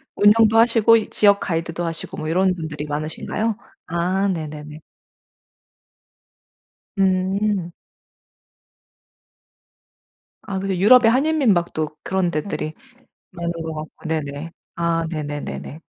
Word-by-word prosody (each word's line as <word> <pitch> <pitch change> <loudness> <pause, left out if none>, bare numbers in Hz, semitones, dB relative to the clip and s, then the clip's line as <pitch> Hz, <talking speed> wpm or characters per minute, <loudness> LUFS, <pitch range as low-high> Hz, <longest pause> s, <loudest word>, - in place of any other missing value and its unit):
운영도 215 +2 +5
하시고 230 -1 +5
이 220 - -3
지역 200 -1 +4
가이드도 165 0 -3
하시고 165 -1 -5
뭐 155 - -4
이런 185 +3 +2
분들이 155 -3 -5
많으신가요? 155 +9 -3 0.3
아 180 +4 0
네네네. 155 -4 -5 2.2
음. 190 0 +1 2.7
아 195 -2 -4
근데 190 -1 -2
유럽의 225 +5 +6
한인민박도 215 - +1
그런 185 -2 0
데들이 155 -1 -3 0.6
많은 170 -2 -3
것 165 -1 -5
같고 155 +1 -8
네네. 155 0 -3 0.2
아 170 -1 0
네네네네. 150 -1 -5
175 Hz, 225 characters per minute, -21 LUFS, 155-200 Hz, 2.7 s, 유럽의